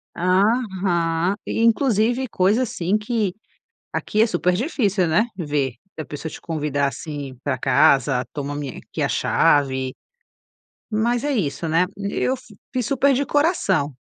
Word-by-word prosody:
Aham 185 Hz, -3 st, +1 dB
e 225 Hz, -, -1 dB
inclusive, 235 Hz, +1 st, +2 dB
coisa, 205 Hz, +6 st, +2 dB
assim, 195 Hz, -4 st, 0 dB
que 215 Hz, -3 st, -1 dB, 0.6 s
aqui 215 Hz, -, 0 dB
é 225 Hz, -, +5 dB
super 180 Hz, -2 st, +1 dB
difícil, 205 Hz, -, +1 dB
né, 210 Hz, +9 st, +2 dB
ver 145 Hz, -6 st, -1 dB, 0.2 s
e 155 Hz, -, -3 dB
a -, -, -7 dB
pessoa 150 Hz, +2 st, -6 dB
te -, -, -9 dB
convidar 150 Hz, -3 st, -1 dB
assim 140 Hz, -3 st, -6 dB
pra 140 Hz, -3 st, -1 dB
casa, 135 Hz, -1 st, +3 dB
toma 145 Hz, 0 st, -4 dB
minha 145 Hz, -3 st, -5 dB
aqui -, -, -7 dB
a -, -, +1 dB
chave, 130 Hz, -2 st, +2 dB, 1.0 s
mas 235 Hz, +4 st, 0 dB
é 290 Hz, -, 0 dB
isso, 165 Hz, -, -1 dB
né. 165 Hz, +3 st, +3 dB
Eu 200 Hz, +6 st, -1 dB
f 250 Hz, -4 st, -16 dB, 0.2 s
fiz 250 Hz, -4 st, -1 dB
super 275 Hz, +1 st, +3 dB
de 275 Hz, +2 st, 0 dB
coração. 245 Hz, -, +1 dB
180 Hz, 150 wpm, -22 LUFS, 145-230 Hz, 1.0 s, é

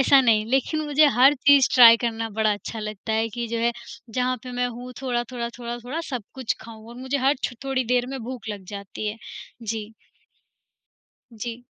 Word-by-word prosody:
ऐसा 270 Hz, 0 st, +6 dB
नहीं। 225 Hz, -4 st, +3 dB
लेक़िन 270 Hz, +4 st, +1 dB
मुझे 295 Hz, +1 st, +5 dB
हर 270 Hz, +3 st, +7 dB
चीज़ 285 Hz, -2 st, +7 dB
ट्राई 230 Hz, -2 st, +10 dB
करना 225 Hz, 0 st, -3 dB
बड़ा 215 Hz, 0 st, +1 dB
अच्छा 210 Hz, +2 st, -6 dB
लगता 215 Hz, 0 st, -5 dB
है 225 Hz, +1 st, +1 dB
कि 235 Hz, +2 st, -4 dB
जो 230 Hz, -, -2 dB
है 235 Hz, +1 st, +1 dB, 0.4 s
जहाँ 250 Hz, +2 st, 0 dB
पे 250 Hz, -, -8 dB
मैं 245 Hz, 0 st, 0 dB
हूँ 245 Hz, +1 st, -8 dB
थोड़ा-थोड़ा, 240 Hz, -1 st, -2 dB
थोड़ा-थोड़ा 240 Hz, +5 st, -5 dB
सब 250 Hz, -4 st, -3 dB
कुछ 260 Hz, -4 st, -2 dB
ख़ाऊँ 220 Hz, -1 st, -12 dB
और 235 Hz, -, -11 dB
मुझे 260 Hz, +2 st, -2 dB
हर 270 Hz, +3 st, +3 dB
छ -, -, -1 dB
थोड़ी 265 Hz, -2 st, 0 dB
देर 245 Hz, +1 st, +1 dB
में 270 Hz, 0 st, -5 dB
भूख 245 Hz, -2 st, -7 dB
लग 205 Hz, -2 st, -6 dB
जाती 200 Hz, +1 st, -6 dB
है। 210 Hz, -, -5 dB, 0.5 s
जी। 220 Hz, 0 st, -4 dB, 1.4 s
जी। 230 Hz, +2 st, -6 dB
240 Hz, 190 wpm, -24 LUFS, 225-255 Hz, 1.4 s, ट्राई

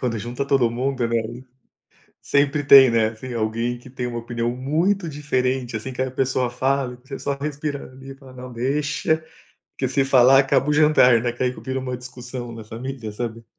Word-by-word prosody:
quando 120 Hz, -3 st, -1 dB
junta 120 Hz, +5 st, -4 dB
todo 135 Hz, -4 st, +3 dB
mundo 125 Hz, +1 st, -1 dB
né, 115 Hz, 0 st, +1 dB
ai. 120 Hz, +3 st, -6 dB, 0.8 s
Sempre 145 Hz, +1 st, +1 dB
tem, 135 Hz, -3 st, +9 dB
né, 115 Hz, -1 st, +2 dB
assim, 115 Hz, +3 st, -8 dB
alguém 115 Hz, +2 st, -2 dB
que, 125 Hz, -, -14 dB
tem 125 Hz, -1 st, -5 dB
uma 120 Hz, -1 st, -4 dB
opinião 120 Hz, 0 st, -2 dB
muito 165 Hz, +9 st, 0 dB
diferente, 130 Hz, -4 st, -1 dB
assim, 120 Hz, +5 st, -6 dB
que 130 Hz, -, -2 dB
a 130 Hz, -, -2 dB
pessoa 130 Hz, -1 st, 0 dB
fala 130 Hz, +1 st, -1 dB
e -, -, -13 dB
que 130 Hz, +2 st, -9 dB
só 140 Hz, -, -2 dB
respira 145 Hz, -1 st, -4 dB
ali 135 Hz, +1 st, -12 dB
e -, -, -8 dB
fala: 135 Hz, -2 st, -15 dB
"Não, 125 Hz, 0 st, -9 dB
deixa, 145 Hz, +5 st, -1 dB, 0.5 s
que 130 Hz, -, 0 dB
se 135 Hz, +2 st, +1 dB
falar 135 Hz, 0 st, +6 dB
acaba 135 Hz, +1 st, +2 dB
o -, -, +3 dB
jantar," 150 Hz, -6 st, +5 dB
né. 120 Hz, -, -1 dB
E -, -, -6 dB
que 120 Hz, -, -5 dB
ai 125 Hz, -, +2 dB
vira 130 Hz, +1 st, -5 dB
uma 130 Hz, -1 st, -4 dB
discussão 125 Hz, 0 st, -8 dB
na 115 Hz, -1 st, -9 dB
família, 115 Hz, 0 st, -6 dB
sabe? 115 Hz, +1 st, -5 dB
130 Hz, 210 wpm, -22 LUFS, 120-135 Hz, 0.8 s, tem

